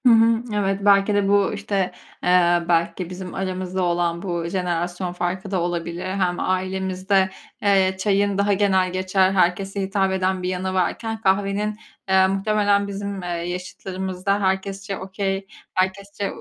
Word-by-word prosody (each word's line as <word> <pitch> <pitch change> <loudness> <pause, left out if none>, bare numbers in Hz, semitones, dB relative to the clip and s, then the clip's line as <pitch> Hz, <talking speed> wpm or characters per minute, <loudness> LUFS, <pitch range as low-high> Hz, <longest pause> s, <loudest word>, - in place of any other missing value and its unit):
Hı - - +8
hı. 225 0 +4
Evet, 195 -1 0
belki 200 0 +5
de 205 -1 +2
bu, 200 0 +3
işte, 200 -2 -1 0.3
eee, 175 -1 +4
belki 170 +1 +1
bizim 185 0 -7
aramızda 185 -1 -2
olan 170 -1 0
bu 175 -3 -2
jenerasyon 175 0 -2
farkı 185 +2 -3
da 185 -3 +1
olabilir. 170 +1 -3
Hem 185 -2 0
ailemizde, 190 +1 0 0.3
eee, 190 -2 +3
çayın 200 0 +1
daha 200 0 +2
genelgeçer, 185 -1 +2
herkese 195 +2 +1
hitap 195 0 +1
eden 190 0 0
bir 180 - -1
yanı 185 +1 -2
varken, 220 +4 -1
kahvenin, 200 +1 +1 0.3
eee, 190 0 +5
muhtemelen 200 +1 +2
bizim, 200 0 -4
eee, - - -5
yaşıtlarımızda 185 +2 -3
herkesçe 195 +1 -1
okay 195 0 -3 0.3
herkesçe 195 +2 -1
190 Hz, 140 wpm, -22 LUFS, 180-200 Hz, 0.3 s, Hı